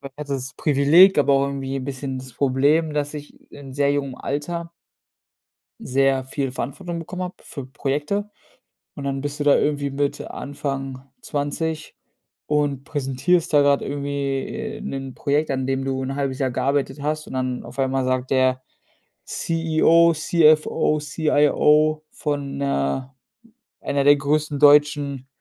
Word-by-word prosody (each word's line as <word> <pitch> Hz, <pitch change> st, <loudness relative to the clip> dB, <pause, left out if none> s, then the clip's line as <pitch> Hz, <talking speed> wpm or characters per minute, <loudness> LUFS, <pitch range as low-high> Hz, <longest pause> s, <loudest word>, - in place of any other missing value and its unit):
Ich -, -, -26 dB
hatte 150 Hz, -1 st, -5 dB
das 135 Hz, +1 st, -5 dB
Privileg, 155 Hz, +6 st, +5 dB
aber 140 Hz, -1 st, +4 dB
auch 135 Hz, 0 st, +3 dB
irgendwie 135 Hz, -1 st, -4 dB
'n 130 Hz, -, -4 dB
bisschen 135 Hz, -1 st, -4 dB
das 130 Hz, -1 st, -9 dB
Problem, 145 Hz, +5 st, +2 dB
dass 145 Hz, 0 st, -2 dB
ich 145 Hz, -1 st, -11 dB
in 140 Hz, -2 st, -11 dB
sehr 140 Hz, 0 st, +2 dB
jungem 140 Hz, -2 st, -2 dB
Alter 170 Hz, +6 st, -4 dB, 1.1 s
sehr 135 Hz, 0 st, +1 dB
viel 135 Hz, 0 st, -3 dB
Verantwortung 170 Hz, +8 st, -5 dB
bekommen 180 Hz, +3 st, -6 dB
habe 180 Hz, 0 st, -5 dB
für 140 Hz, -4 st, -8 dB
Projekte 150 Hz, +10 st, -2 dB, 0.6 s
und 140 Hz, -, -7 dB
dann 135 Hz, 0 st, -2 dB
bist 145 Hz, +1 st, -5 dB
du -, -, 0 dB
da 145 Hz, -, +6 dB
irgendwie 145 Hz, -1 st, 0 dB
mit 140 Hz, +1 st, -1 dB
Anfang 135 Hz, -2 st, -5 dB, 0.2 s
20 155 Hz, +2 st, -3 dB, 0.5 s
und 145 Hz, -2 st, 0 dB
präsentierst 145 Hz, +5 st, 0 dB
da 145 Hz, -1 st, +6 dB
grad 140 Hz, 0 st, +3 dB
irgendwie, 140 Hz, -1 st, -2 dB
äh, 220 Hz, 0 st, -6 dB
'nen 135 Hz, -10 st, -5 dB
Projekt, 145 Hz, +2 st, 0 dB
an 130 Hz, -1 st, -1 dB
dem 135 Hz, 0 st, -1 dB
du 135 Hz, -1 st, -2 dB
1/2 135 Hz, 0 st, -2 dB
Jahr 135 Hz, -2 st, 0 dB
gearbeitet 140 Hz, +3 st, -1 dB
hast 155 Hz, +1 st, -2 dB
und -, -, -10 dB
dann 130 Hz, -1 st, -2 dB
auf -, -, -12 dB
einmal 135 Hz, 0 st, 0 dB
sagt 130 Hz, 0 st, -1 dB
der 130 Hz, -1 st, +2 dB, 0.6 s
CEO, 165 Hz, 0 st, +3 dB
CFO, 155 Hz, -1 st, +3 dB
CIO 150 Hz, 0 st, +2 dB
von 140 Hz, -2 st, -3 dB
'ner 130 Hz, -, -2 dB, 0.7 s
einer 140 Hz, 0 st, 0 dB
der 145 Hz, +1 st, +7 dB
größten 145 Hz, +1 st, -1 dB
deutschen, 145 Hz, -2 st, +4 dB
140 Hz, 150 wpm, -22 LUFS, 135-150 Hz, 1.1 s, der